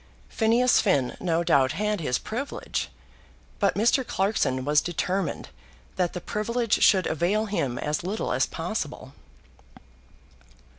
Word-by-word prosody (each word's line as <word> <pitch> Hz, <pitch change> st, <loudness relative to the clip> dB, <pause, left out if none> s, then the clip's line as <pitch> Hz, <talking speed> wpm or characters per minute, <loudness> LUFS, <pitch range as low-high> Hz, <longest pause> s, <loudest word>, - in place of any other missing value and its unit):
Phineas 235 Hz, +3 st, +3 dB
Finn 140 Hz, -, +1 dB
no 170 Hz, -1 st, 0 dB
doubt 135 Hz, -4 st, +3 dB
had 210 Hz, +2 st, -1 dB
his 125 Hz, -5 st, 0 dB
privilege, 260 Hz, +6 st, -4 dB, 0.7 s
but 200 Hz, -2 st, +2 dB
Mr. 235 Hz, +5 st, +3 dB
Clarkson 190 Hz, -, 0 dB
was 150 Hz, +1 st, +4 dB
determined 180 Hz, +3 st, -2 dB, 0.5 s
that 180 Hz, -2 st, 0 dB
the 180 Hz, -, -4 dB
privilege 230 Hz, +5 st, -1 dB
should 190 Hz, -3 st, +5 dB
avail 185 Hz, +7 st, 0 dB
him 140 Hz, -, -2 dB
as 150 Hz, +5 st, -2 dB
little 200 Hz, +5 st, -2 dB
as 130 Hz, +2 st, +1 dB
possible. 165 Hz, -6 st, -5 dB
185 Hz, 120 wpm, -26 LUFS, 150-215 Hz, 0.7 s, should